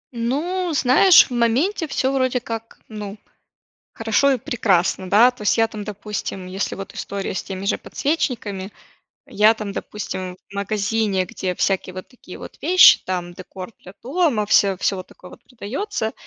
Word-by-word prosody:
Ну, 330 +10 -1
знаешь, 290 +9 +6
в - - -3
моменте 265 - +1
всё 265 -1 -1
вроде 255 -1 +1
как, 230 -1 -7
ну, 210 -2 -7 0.8
хорошо 225 +5 +2
и 260 - +1
прекрасно, 190 -6 0
да. 225 +5 +6
То 245 - -16
есть 205 - +2
я 225 0 +3
там, 215 -2 -7
допустим, 205 -2 -6
если 190 +2 -3
вот 195 -1 -8
история 200 -1 -4
с - - -3
теми 190 0 -6
же - - +1
подсвечниками, 225 -10 -3 0.6
я 215 +2 +4
там, 215 -2 -6
допустим, 185 -3 -6
в - - -14
магазине, 200 -1 0
где 185 +1 -4
всякие 190 -1 -1
вот 185 - -7
такие 250 - -13
вот - - -11
вещи, 365 +1 +7
там 180 -1 -3
декор 185 +3 -9
для 185 - -13
дома, 270 - 0
всё, 200 -2 +3
всё 195 - 0
вот 185 - -7
такое 180 - -15
вот - - -15
продается, 250 - -4
215 Hz, 165 wpm, -21 LUFS, 195-250 Hz, 0.8 s, вещи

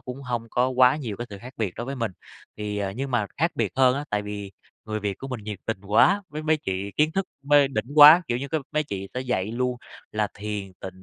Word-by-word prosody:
cũng 130 +2 -8
hông 120 -3 -3
có 125 +1 +2
quá 130 +1 +5
nhiều 115 -9 -5
cái 120 - -5
sự 100 - -8
khác 125 +4 -10
biệt 105 -6 -2
đối 120 - -4
với 135 0 -4
mình. 115 -5 -2 0.4
Thì, 105 -1 -3
à, 100 -1 -2
nhưng 135 +4 -4
mà 115 -5 +1
khác 165 +4 +1
biệt 110 -5 -1
hơn 130 -1 +5
á, 145 - -3
tại 105 0 0
vì 100 -1 -6 0.3
người 110 0 -3
Việt 100 -2 -3
của 135 - -7
mình 120 -5 -6
nhiệt 105 -3 -5
tình 110 -4 -2
quá, 195 - +4
với 155 +1 -6
mấy 155 0 +2
chị 95 -6 -4
kiến 155 +1 +3
thức 195 +1 -1 0.2
mê 145 -1 +5
đỉnh 110 -5 -2
quá, 155 +4 +10
kiểu 120 0 0
như, 140 - -4 0.3
mấy 150 0 +1
chị 100 -6 -5
sẽ 125 - -2
dạy 110 -5 -2
luôn 125 +1 -1 0.4
là 105 -1 0
thiền 100 -2 -5
tịnh 95 0 -9
120 Hz, 255 wpm, -25 LUFS, 105-135 Hz, 0.4 s, quá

